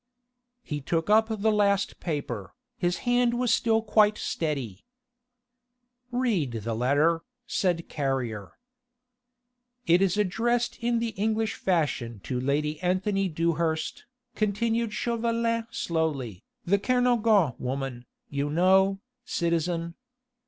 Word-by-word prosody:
He 150 -6 -4
took 165 +7 -1
up 220 +1 +5
the 220 0 +1
last 200 -1 +1
paper; 140 - -4 0.2
his 175 -6 0
hand 245 0 +3
was 245 -1 +2
still 225 -1 +2
quite 215 -1 +4
steady. 135 - -3 1.3
"Read 230 - 0
the 115 +1 -2
letter," 145 +8 +2 0.2
said 175 -3 0
Carrier. 125 -9 -3 1.3
"It 170 +2 +4
is 195 0 +2
addressed 235 +5 0
in 235 0 +1
the 230 0 -1
English 220 +1 -1
fashion 140 - -1
to 125 -2 -2
Lady 150 +3 0
Anthony 190 +2 0
Dewhurst," 165 0 -1 0.3
continued 225 +2 0
Chauvelin 230 0 -1
slowly, 145 - -2 0.2
"the 200 +3 +3
Kernogan 230 - +3
woman, 130 -1 -4 0.2
you 140 +1 -2
know, 190 +4 +4 0.2
citizen. 170 -3 -1
180 Hz, 110 wpm, -27 LUFS, 150-220 Hz, 1.3 s, up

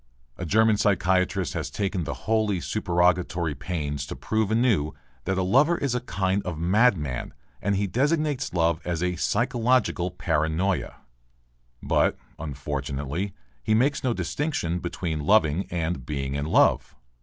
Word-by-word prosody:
A 90 - -5
German 110 +3 +4
psychiatrist 95 -2 +1
has 80 -6 -3
taken 95 0 -2
the - - -4
wholly 110 -4 +1
supererogatory 90 -3 +1
pains 75 -1 -4
to - - -6
prove 110 -2 -1
anew 110 - +2 0.3
that 95 - 0
a 95 - +1
lover 140 - +4
is 140 -3 -1
a 125 - +1
kind 95 -3 -1
of 90 -4 -5
madman 85 - +1 0.3
and 100 +2 +1
he 100 +1 +1
designates 140 - 0
love 85 -2 +1
as 85 -2 -2
"physiological 115 +2 +1
paranoia." 80 -2 -1 0.8
But, - - +2 0.2
unfortunately, 70 +4 -4 0.3
he 110 - +1
makes 140 +5 +2
no 130 - +2
distinction 110 - -2
between 85 -2 -3
loving 80 +1 +3
and 85 -5 -2
being 70 0 -3
in 70 +1 -2
love. - - +3
90 Hz, 135 wpm, -25 LUFS, 80-110 Hz, 0.8 s, German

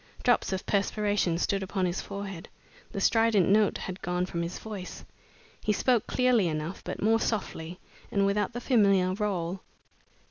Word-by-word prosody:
Drops 245 -4 +3
of 190 0 -3
perspiration 205 -3 +1
stood 195 +3 0
upon 190 0 -1
his 175 +1 -1
forehead. 195 -4 -7 0.4
The - - -4
strident 225 -3 +3
note 210 +1 +3
had 185 0 -6
gone 180 +1 -1
from 170 -2 -3
his 170 +1 -4
voice. 205 -4 -8 0.6
He 210 - +1
spoke 240 0 +2
clearly 250 -6 +3
enough, 155 +2 -4
but - - -5
more 225 +1 +4
softly, 180 -6 -3 0.3
and 200 -1 +2
without 200 +2 0
the 240 - -4
familiar 195 -7 +3
roll. 190 -3 -2
195 Hz, 155 wpm, -28 LUFS, 180-215 Hz, 0.6 s, more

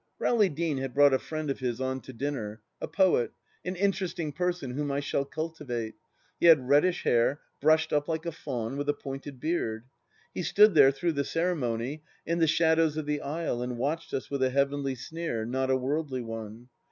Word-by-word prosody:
Rowley 215 -5 +3
Deane 155 -2 -1
had 135 -1 -4
brought 145 -1 +6
a 130 - +3
friend 155 -2 -3
of - - -4
his 125 -2 -2
on 130 0 -2
to - - -10
dinner: 115 -4 -4 0.2
a - - -2
poet, 185 -11 +2 0.3
an 180 +1 -3
interesting 185 -4 -1
person 180 -6 -2
whom 145 +2 -2
I 140 - 0
shall 140 -1 -1
cultivate. 140 -6 -4 0.5
He - - +4
had 150 -7 +7
reddish 150 +6 +3
hair, 120 +4 +2 0.2
brushed 155 +2 +3
up 145 -1 +1
like 160 0 -2
a 170 - -1
faun, 130 -5 -4
with 145 0 -2
a 145 - +2
pointed 135 -1 -7
beard. 120 -8 -2 0.5
He - - -3
stood 205 +5 +5
there, 140 -4 +8
through 165 +5 -1
the 140 -1 0
ceremony, 145 -5 -1 0.2
in 170 +1 0
the 165 - +4
shadows 160 -1 +3
of 155 - -2
the 150 0 -1
aisle 145 -4 -2
and 125 -1 -3
watched 150 +7 -2
us 130 - -4
with 140 -1 -2
a 130 - +3
heavenly 140 0 0
sneer, 130 -4 -4
not 130 +2 -1
a 130 - +3
worldly 135 -1 -2
one. 115 +1 -7
145 Hz, 200 wpm, -28 LUFS, 130-160 Hz, 0.5 s, there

